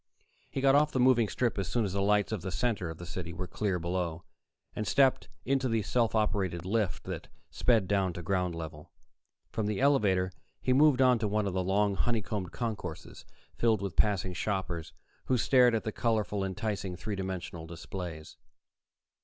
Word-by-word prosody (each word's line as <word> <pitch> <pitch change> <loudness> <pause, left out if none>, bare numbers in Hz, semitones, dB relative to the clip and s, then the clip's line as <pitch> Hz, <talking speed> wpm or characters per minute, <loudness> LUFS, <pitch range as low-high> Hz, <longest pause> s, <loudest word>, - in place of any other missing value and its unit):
He 135 - -3
got 135 0 +5
off 150 +1 +4
the 130 - -1
moving 125 -3 +5
strip 120 -1 -1
as 95 - -2
soon 115 +2 0
as 95 - -3
the 100 - 0
lights 105 +1 +2
of 110 -5 -2
the 95 - -4
center 95 -1 -1
of 80 - -7
the 85 - -8
city 85 -1 -5
were 90 +2 -4
clear 95 +1 -1
below, 85 -1 -2 0.5
and 105 - -3
stepped 135 -2 +3 0.2
into 130 0 +1
the 115 -2 +1
self 115 0 +1
operated 95 -5 0
lift 100 -7 0
that - - -6 0.2
sped 115 -6 +2
down 95 -3 +1
to 90 - -7
ground 90 -1 0
level. 80 -2 -8 0.6
From 110 -2 -1
the 105 -1 -1
elevator, 105 -10 +3 0.3
he 130 - +1
moved 140 -1 +5
on 125 -2 +5
to 110 - 0
one 105 0 0
of 100 - -2
the 95 0 0
long, 100 +2 +2
honeycombed 105 -3 -1
concourses, 105 -9 -5 0.3
filled 110 -4 +1
with 95 -4 -4
passing 95 -3 +2
shoppers 95 -3 -3 0.3
who 130 - +2
stared 125 0 +5
at 110 - -1
the 110 - -2
colorful, 105 -3 0
enticing 95 -1 -3
three 105 +3 -4
dimensional 95 -3 -5
displays. 85 -1 -7
100 Hz, 185 wpm, -30 LUFS, 90-115 Hz, 0.6 s, got